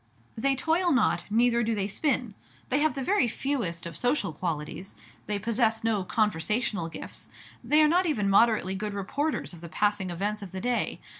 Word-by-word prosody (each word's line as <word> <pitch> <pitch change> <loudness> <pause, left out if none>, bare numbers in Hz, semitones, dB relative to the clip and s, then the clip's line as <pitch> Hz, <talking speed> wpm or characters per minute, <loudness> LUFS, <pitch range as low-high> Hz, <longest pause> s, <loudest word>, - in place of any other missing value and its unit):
They 270 +4 +1
toil 330 +6 +1
not, 255 -7 +2
neither 235 +2 +3
do 225 -1 0
they 200 -2 -1
spin. 245 +1 -1 0.4
They 270 - +2
have 310 0 +2
the 270 - -3
very 375 -6 +2
fewest 225 - -2
of 170 -2 -7
social 245 - 0
qualities; 165 +3 -4 0.3
they 210 - 0
possess 225 +1 0
no 220 -4 +1
conversational 210 -1 0
gifts; - - -9 0.3
they 305 +1 +4
are - - +6
not 355 +3 +3
even 215 -11 0
moderately 200 -1 +4
good 205 +1 -4
reporters 280 - -2
of 170 - -12
the 170 - -8
passing 205 0 0
events 205 +5 -2
of 190 -2 -9
the 190 - -4
day. 245 0 -1
215 Hz, 180 wpm, -27 LUFS, 195-260 Hz, 0.4 s, are